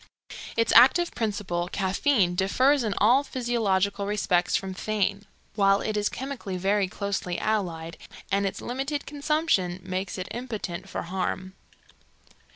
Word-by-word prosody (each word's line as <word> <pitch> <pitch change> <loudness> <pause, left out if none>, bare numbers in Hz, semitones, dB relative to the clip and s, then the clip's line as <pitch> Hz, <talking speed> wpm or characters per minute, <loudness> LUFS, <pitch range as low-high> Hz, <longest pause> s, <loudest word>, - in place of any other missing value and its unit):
Its 230 0 +2
active 335 +9 +6
principle, 200 -6 -2
caffeine, 195 0 +1
differs 255 +10 +3
in 215 -3 -1
all 245 +7 +5
physiological 205 -7 0
respects 180 -4 +1
from 195 -1 -2
theine, 200 0 -1 0.3
while 195 -1 +4
it 215 - -2
is 210 0 +1
chemically 255 -8 -5
very 195 +1 +1
closely 190 -2 -3
allied, 170 -7 -2 0.3
and 200 +1 +2
its 190 - -5
limited 275 +4 -3
consumption 290 - 0
makes 185 +1 -4
it 185 +1 -4
impotent 220 -8 -5
for - - -4
harm. 185 +1 -3
200 Hz, 130 wpm, -26 LUFS, 185-240 Hz, 0.3 s, active